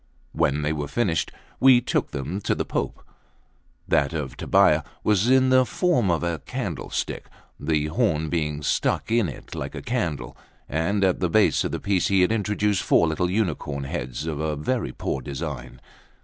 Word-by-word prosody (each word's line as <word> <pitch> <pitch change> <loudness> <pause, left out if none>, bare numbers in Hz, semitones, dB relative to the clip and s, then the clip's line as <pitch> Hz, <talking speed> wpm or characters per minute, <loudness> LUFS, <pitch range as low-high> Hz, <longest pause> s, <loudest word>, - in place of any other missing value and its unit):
When 75 +2 +1
they 75 +1 0
were 75 -2 -3
finished, 85 -6 0 0.3
we 130 -2 +7
took 120 - -1
them 80 +9 -4
to - - +2
the - - -2
Pope. - - -3 0.8
That 70 0 +2
of 75 -5 -4
Tobbia - - +3 0.2
was 105 +2 +2
in 130 0 +5
the 130 0 +6
form 125 - +1
of 85 -1 +1
a 85 -2 -1
candlestick, - - -4 0.3
the 75 0 0
horn 80 0 0
being 75 -2 -2
stuck 110 - 0
in 115 -6 +2
it 70 - -10
like - - -5
a - - -5
candle, 105 - -2 0.3
and 90 +7 0
at 95 -2 +2
the 90 - 0
base 110 +5 +3
of - - -2
the - - -3
piece 100 -3 +1
he 95 -2 +3
had 90 - +3
introduced 105 -2 +1
four 85 - +3
little 80 +3 0
unicorns' 80 -8 -1
heads 65 +4 -4
of 80 -3 -3
a 80 -1 -1
very 115 - -2
poor 65 - -3
design. 65 -2 -6
85 Hz, 175 wpm, -24 LUFS, 75-105 Hz, 0.8 s, we